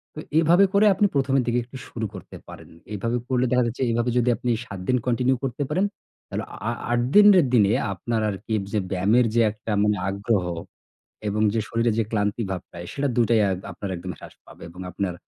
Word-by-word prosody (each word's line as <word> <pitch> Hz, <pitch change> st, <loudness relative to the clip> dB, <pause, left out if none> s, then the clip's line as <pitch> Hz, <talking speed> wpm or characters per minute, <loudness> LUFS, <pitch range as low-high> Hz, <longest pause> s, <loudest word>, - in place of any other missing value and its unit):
তো -, -, -6 dB, 0.2 s
এভাবে 175 Hz, +5 st, +5 dB
করে 205 Hz, +2 st, +5 dB
আপনি 205 Hz, -, +2 dB
১ম 135 Hz, -1 st, +1 dB
এর -, -, +1 dB
দিকে 120 Hz, +1 st, +2 dB
একটু 125 Hz, +3 st, -11 dB
শুরু 115 Hz, -1 st, -4 dB
করতে 95 Hz, -4 st, -10 dB
পারেন। -, -, -12 dB, 0.2 s
এভাবে 115 Hz, +4 st, -1 dB
করলে 130 Hz, -1 st, +1 dB
দেখা 125 Hz, 0 st, +3 dB
যাচ্ছে 120 Hz, +3 st, -3 dB
এভাবে 120 Hz, +1 st, 0 dB
যদি 125 Hz, 0 st, +2 dB
আপনি 125 Hz, 0 st, -3 dB, 0.2 s
৭ 100 Hz, -5 st, -8 dB
দিন 125 Hz, -, +3 dB
কন্টিনিউ 125 Hz, +2 st, +2 dB
করতে 135 Hz, +2 st, -2 dB
পারেন, 185 Hz, +6 st, +1 dB, 0.4 s
তাহলে -, -, -4 dB
আ -, -, -10 dB
আ -, -, 0 dB, 0.2 s
৮ 120 Hz, 0 st, +2 dB
দিনের 205 Hz, -6 st, +8 dB
দিনে 105 Hz, -3 st, +5 dB, 0.2 s
আপনার 115 Hz, +3 st, -2 dB
আরকি 105 Hz, +3 st, -5 dB, 0.2 s
যে 105 Hz, -, +2 dB
ব্যায়ামের 105 Hz, +7 st, +3 dB
মানে 110 Hz, -, -5 dB
যে 115 Hz, -, +5 dB
একটা 110 Hz, +1 st, -7 dB, 0.4 s
আগ্রহ 100 Hz, -1 st, 0 dB, 0.8 s
এবং 105 Hz, +1 st, -1 dB
যে 115 Hz, -, +1 dB
শরীরে 115 Hz, 0 st, +1 dB
যে -, -, +3 dB
ক্লান্তি 105 Hz, +1 st, 0 dB
ভাবটা, 90 Hz, -1 st, -7 dB, 0.2 s
সেটা 140 Hz, 0 st, -1 dB
দুইটাই 115 Hz, -1 st, +3 dB
অ্যা 100 Hz, -, +2 dB, 0.2 s
আপনার 100 Hz, -, -6 dB
একদম 90 Hz, +1 st, -6 dB
হ্রাস -, -, -12 dB
পাবে -, -, -14 dB
এবং 90 Hz, +2 st, -14 dB
আপনার 95 Hz, 0 st, -2 dB
115 Hz, 205 wpm, -24 LUFS, 105-125 Hz, 0.8 s, দিনের